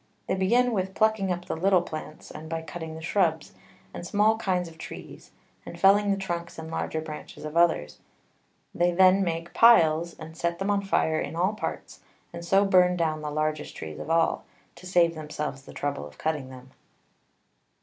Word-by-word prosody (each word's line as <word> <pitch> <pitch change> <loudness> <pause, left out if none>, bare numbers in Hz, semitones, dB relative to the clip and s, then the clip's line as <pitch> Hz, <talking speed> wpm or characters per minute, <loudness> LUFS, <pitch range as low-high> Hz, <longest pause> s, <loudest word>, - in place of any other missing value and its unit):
They - - -1
begin 235 +7 +2
with 190 -3 -2
plucking 215 -3 +2
up 175 0 -3
the - - -3
little 185 +1 +3
Plants, 155 -2 -8
and 155 +1 -9
by 165 0 -3
cutting 160 0 -7
the 160 - -9
Shrubs, 165 -2 0 0.4
and - - -7
small 210 +4 +2
kinds 180 -5 0
of 160 -1 -14
Trees, - - -10 0.3
and - - -10
felling 200 +1 +5
the 200 - +2
Trunks 170 -3 -5
and 160 0 -7
larger 160 - -2
Branches 155 -1 -9
of 155 +1 -6
others; 170 - +2 0.7
they 175 +1 +2
then 190 +2 +5
make 170 -1 -3
Piles, 170 -8 +5
and 160 0 -10
set 170 +1 -2
them 195 +3 -1
on 200 -1 +1
fire 160 -5 +1
in - - -4
all 185 +5 +1
Parts, 215 - -6 0.3
and 170 0 -7
so 195 +4 +3
burn 180 -2 +4
down 155 -2 -1
the 150 - -4
largest 155 0 -2
Trees 80 -1 -7
of - - -7
all, 165 0 +2 0.3
to 185 +2 -12
save 175 -2 +3
themselves 150 -3 -5
the - - -13
trouble 140 - -3
of 75 - -17
cutting 150 -4 -2
them. 130 0 -13
170 Hz, 190 wpm, -26 LUFS, 160-190 Hz, 0.7 s, felling